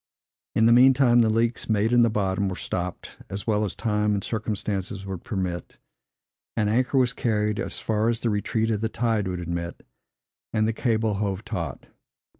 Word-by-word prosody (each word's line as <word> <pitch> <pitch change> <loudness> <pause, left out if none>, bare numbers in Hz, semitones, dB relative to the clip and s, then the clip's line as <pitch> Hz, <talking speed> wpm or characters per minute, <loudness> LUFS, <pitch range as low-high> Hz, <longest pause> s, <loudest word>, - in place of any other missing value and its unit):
In 110 - +4
the 115 - +6
mean 130 +2 +7
time, 120 -3 +5
the 110 - +3
leaks, 115 +2 0
made 110 +2 +2
in 120 - +6
the 115 - +5
bottom, 100 -2 0
were 95 - -4
stopped, 90 0 -5
as 100 0 -4
well 105 -2 +1
as 100 -4 -3
time 105 -2 +1
and 100 - -2
circumstances 105 -3 -3
would 95 -3 -6
permit; 95 -8 -4 0.8
an 105 -2 +2
anchor 125 +5 +1
was 125 -2 +3
carried 105 -3 0
as - - -3
far 110 +1 0
as 115 -1 -1
the 115 - +1
retreat 110 +2 0
of 105 -1 -1
the 110 - 0
tide 110 -4 0
would 90 -1 -3
admit, 85 0 -5 0.7
and 110 -1 +1
the 115 - 0
cable 110 -2 +1
hove 100 -1 -2
taut. - - -4
110 Hz, 190 wpm, -25 LUFS, 100-115 Hz, 0.8 s, mean